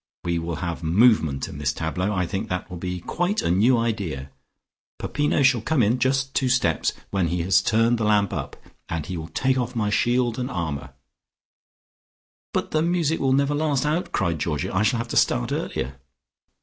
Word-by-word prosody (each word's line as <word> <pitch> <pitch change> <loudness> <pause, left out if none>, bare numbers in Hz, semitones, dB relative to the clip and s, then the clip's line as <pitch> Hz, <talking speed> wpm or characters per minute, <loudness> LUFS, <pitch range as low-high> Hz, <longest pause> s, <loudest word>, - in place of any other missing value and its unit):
We 85 -1 0
will 85 0 -3
have 85 -1 -4
movement 85 - +3
in 70 - -8
this 75 -1 +1
tableau; 85 +6 -2
I 90 -3 0
think 95 +5 -4
that 90 0 -4
will 90 - -5
be 90 0 -4
quite 175 - -1
a - - +1
new 115 +8 +4
idea. 95 -13 -2 0.7
Peppino 145 -1 0
shall 125 -3 +4
come 145 +1 +2
in 115 +5 +2
just 135 +1 +1
two 130 - +1
steps 125 -11 +1 0.2
when 95 -3 +1
he 85 +1 -1
has 95 +3 +4
turned 115 +2 +2
the - - 0
lamp 105 -2 +2
up, 70 -3 -4 0.3
and 80 -3 -3
he 90 - -5
will 80 -1 -5
take 130 +10 0
off 125 0 -3
my 105 -3 0
shield 120 +2 +1
and 125 +1 -2
armour 70 - -4 0.8
" - - -
"But - - -2
the 155 - +2
music 165 -2 +1
will 135 -1 +2
never 140 +1 +2
last 145 -2 0
out," 155 +4 -1
cried 85 -6 0
Georgie. 85 +4 -2
"I 95 - +1
shall 110 +3 +2
have 115 0 -4
to - - -1
start - - +2
earlier." 65 +2 -3
105 Hz, 200 wpm, -24 LUFS, 85-130 Hz, 0.8 s, new